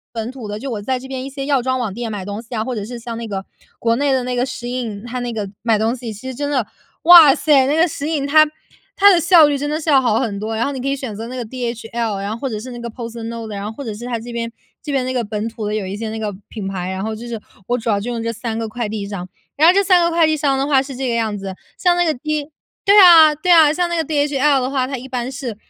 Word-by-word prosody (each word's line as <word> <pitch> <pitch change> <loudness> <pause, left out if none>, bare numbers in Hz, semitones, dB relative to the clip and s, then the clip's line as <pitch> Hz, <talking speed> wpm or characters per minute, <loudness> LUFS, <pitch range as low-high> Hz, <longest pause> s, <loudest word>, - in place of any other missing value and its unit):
本 225 +1 -3
土 255 -5 -8
的， 205 +1 -4
就 270 +3 -5
我 215 - -3
在 260 +3 -1
这 265 - -10
边 260 -1 -5
一 - - -5
些 275 0 -5
药 275 -4 +2
妆 260 0 0
网 230 -5 -2
店 230 +2 -5
买 200 -3 -5
东 205 +2 -5
西 235 +1 -10
啊， 220 -1 -1
或 255 0 -3
者 205 -2 -4
是 240 +2 -7
像 230 0 -6
那 230 - -5
个 195 -2 -4 0.3
国 230 0 +1
内 280 0 +1
的 255 -2 +1
那 250 0 -2
个 245 +1 +1
SHEIN 240 -4 -5
它 250 +1 -4
那 240 -1 -3
个 210 -3 -4
买 225 -2 +2
东 225 +3 +1
西 235 -3 -6
其 210 +5 -10
实 260 - -5
真 285 +2 -3
的 255 -6 0 0.4
哇 325 -5 +9
塞， 285 -3 +3
那 290 +3 +1
个 330 +2 +4
SHEIN， 295 -2 -2
它 310 +2 +6 0.5
它 405 0 +7
的 340 - +3
效 335 -2 +7
率 290 -1 +1
真 290 - -3
的 305 +2 -2
是 315 - -1
要 275 -2 +6
好 230 -4 +1
很 210 -6 -2
多， 220 +2 -3
然 230 - 0
后 280 - -2
你 265 - -5
可 265 - -2
以 275 - 0
选 255 -5 -6
择 225 +3 -6
那 255 - -7
个 245 - -4
DHL， 235 -3 -4
然 200 - -4
后 225 - -5
或 270 +2 -3
者 215 -3 -4
是 255 +4 -8
那 240 - -8
个 235 0 -5
PostNord， 230 -1 -6
然 200 0 -5
后 215 - -4
或 280 +5 -8
者 220 -3 -5
是 240 +3 -8
它 240 -2 -2
这 235 +2 -9
边 230 0 -3 0.3
这 295 - -5
边 270 -2 0
那 255 - -2
个 245 -2 0
本 210 +1 -3
土 225 -2 -6
的 210 - -2
有 205 -3 -2
一 195 +2 -5
些 220 0 -4
那 220 - -5
个 210 -2 -3
品 210 -4 -6
牌， 185 -1 -4
然 190 0 -4
后 220 0 -3
就 235 +2 -8
是 230 -2 -5 0.3
我 245 +1 0
主 230 0 -2
要 200 -1 +1
就 240 +4 -4
用 230 -1 -3
这 230 0 -2
3 225 0 -4
个 225 - -3
快 235 0 -4
递 210 -1 -4
商。 185 -3 -6 0.3
然 310 - +5
后 360 - +6
这 400 - +4
3 370 -2 +4
个 340 - +2
快 335 -1 +3
递 310 0 +1
商 280 -2 +1
的 270 - 0
话 280 -2 +4
是 270 0 -6
这 265 -1 -2
个 235 - 0
样 220 -3 -1
子， 195 -1 -6 0.2
像 355 -2 +2
那 350 - +3
个 315 -2 +1
D 300 +2 -3 0.4
对 400 +1 +5
啊 325 -5 +8
对 335 +5 -2
啊， 315 -3 +7
像 350 +2 0
那 345 - -2
个 325 - 0
DHL 290 -2 +2
的 255 - -2
话， 260 -2 0
它 270 0 -4
一 260 +2 -9
般 250 -1 -3
是 250 -6 -5
245 Hz, 380 characters per minute, -19 LUFS, 220-280 Hz, 0.5 s, 哇